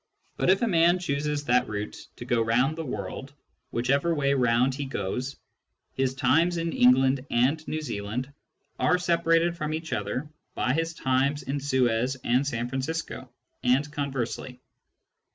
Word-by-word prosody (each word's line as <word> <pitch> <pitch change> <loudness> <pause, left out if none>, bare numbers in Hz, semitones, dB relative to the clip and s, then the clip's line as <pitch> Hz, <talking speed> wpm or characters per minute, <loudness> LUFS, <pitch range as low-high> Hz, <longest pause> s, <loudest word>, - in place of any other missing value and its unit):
But - - 0
if 190 +4 +4
a - - +3
man 170 -2 +4
chooses 150 -3 -2
that 125 0 +3
route 105 0 -5
to 120 - -9
go 120 -1 +1
round 125 +6 +2
the 165 - -4
world, 125 +2 -6 0.4
whichever 140 +8 +1
way 140 -2 +2
round 125 0 +2
he 140 +1 -4
goes, 130 +3 -3 0.6
his 130 -1 0
times 165 +6 +3
in 165 0 -2
England 130 +1 +4
and 130 +7 +2
New 155 - -2
Zealand 125 +1 -4 0.5
are 180 - +3
separated 170 -1 +2
from 155 -2 -2
each 160 0 -5
other 135 +4 -2 0.3
by 125 - +1
his 165 +2 -1
times 135 +2 +1
in 135 +2 -2
Suez 130 -2 +1
and 125 +4 +2
San 120 -3 -2
Francisco, 135 0 -4 0.3
and 135 +4 +2
conversely. 130 -3 -3
135 Hz, 150 wpm, -27 LUFS, 125-155 Hz, 0.6 s, if